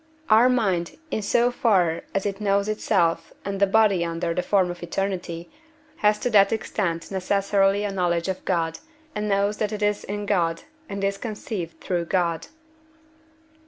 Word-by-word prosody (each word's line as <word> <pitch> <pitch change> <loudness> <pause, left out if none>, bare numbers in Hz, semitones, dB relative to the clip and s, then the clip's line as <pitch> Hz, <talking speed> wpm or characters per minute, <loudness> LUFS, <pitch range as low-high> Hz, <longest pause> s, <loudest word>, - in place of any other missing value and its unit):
Our 230 +4 +7
mind, 195 -9 0
in - - -1
so 240 +4 +2
far 185 -9 +2
as 195 - 0
it 200 0 -3
knows 200 0 +2
itself 170 -6 0
and 195 0 -3
the 200 - +4
body 200 -3 +3
under 170 0 -2
the 180 - 0
form 185 -2 +2
of 175 - -9
eternity, 175 -1 -3 0.5
has 210 0 +3
to 245 - 0
that 200 -2 +5
extent 170 -6 -2
necessarily 195 +1 +1
a 205 - -1
knowledge 175 -2 0
of 190 -1 -3
God, 165 -3 -1 0.3
and 210 0 -2
knows 200 +1 +1
that 215 -1 -1
it 210 -1 -3
is 205 0 +1
in 205 +1 -4
God, 170 -5 0 0.3
and 200 0 -4
is 195 0 0
conceived 205 -7 -5
through 175 -2 -1
God. 170 -2 0
195 Hz, 165 wpm, -24 LUFS, 175-210 Hz, 0.5 s, Our